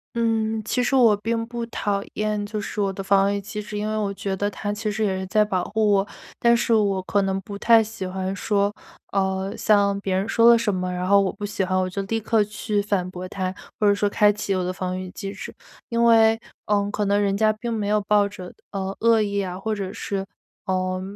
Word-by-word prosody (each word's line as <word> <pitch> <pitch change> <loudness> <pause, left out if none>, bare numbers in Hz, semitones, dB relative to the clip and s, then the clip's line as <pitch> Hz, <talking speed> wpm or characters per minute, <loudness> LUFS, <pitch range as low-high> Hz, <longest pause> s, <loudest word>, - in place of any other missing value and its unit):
嗯， 225 -1 0
其 250 +3 0
实 245 - -1
我 235 -5 +6
并 230 +2 -2
不 235 0 -4
讨 200 -3 -2
厌 210 -1 -1
就 210 +1 -4
是 210 0 -4
我 195 -1 +1
的 195 - -6
防 195 +1 +3
御 200 - -1
机 210 +2 -6
制， 210 0 -6
因 210 +1 -2
为 215 - -2
我 205 -2 -1
觉 195 0 -3
得 205 +2 -1
它 205 0 -3
其 210 +1 -3
实 215 +1 -1
也 190 -2 0
是 190 - -4
在 210 +2 +3
保 185 -3 -1
护 215 +2 0
我， 200 -1 +3 0.3
但 235 0 +4
是 235 0 +1
我 200 -3 +2
可 200 +2 +1
能 195 0 -1
不 200 +1 -8
太 225 +2 +5
喜 220 -3 -5
欢 190 +1 -3
说 205 0 0 0.4
呃， 190 0 -1
像 200 -2 +3
别 195 -1 -2
人 190 +2 0
说 230 +1 +5
了 235 - +7
什 210 -4 0
么， 185 0 -2
然 180 0 -3
后 200 +1 +5
我 195 - 0
不 205 0 -6
喜 200 -1 -2
欢， 185 0 0
我 185 0 0
就 195 +2 -3
立 225 +3 -1
刻 220 0 +2
去 210 0 -2
反 200 -3 -1
驳 185 0 -7
他， 185 -1 -3 0.2
或 210 - +3
者 205 - +5
说 205 0 +1
开 210 0 +4
启 200 -1 -2
我 185 - 0
的 180 - -2
防 185 0 -3
御 185 0 -6
机 195 0 -6
制。 - - -8 0.3
因 235 0 0
为， 225 -1 +5 0.3
呃， 205 -1 +1
可 210 0 -1
能 200 +1 +2
人 200 -1 +1
家 215 0 +3
并 235 +2 -5
没 210 -2 -2
有 210 0 +2
抱 205 0 +3
着， 185 -3 -10 0.2
呃， 195 -1 -3
恶 230 -1 +4
意 200 -1 -1
啊， 185 -2 -3
或 220 +3 -2
者 195 -2 -4
是， 195 -1 -3 0.4
呃， 185 0 -1
205 Hz, 265 characters per minute, -23 LUFS, 195-215 Hz, 0.4 s, 了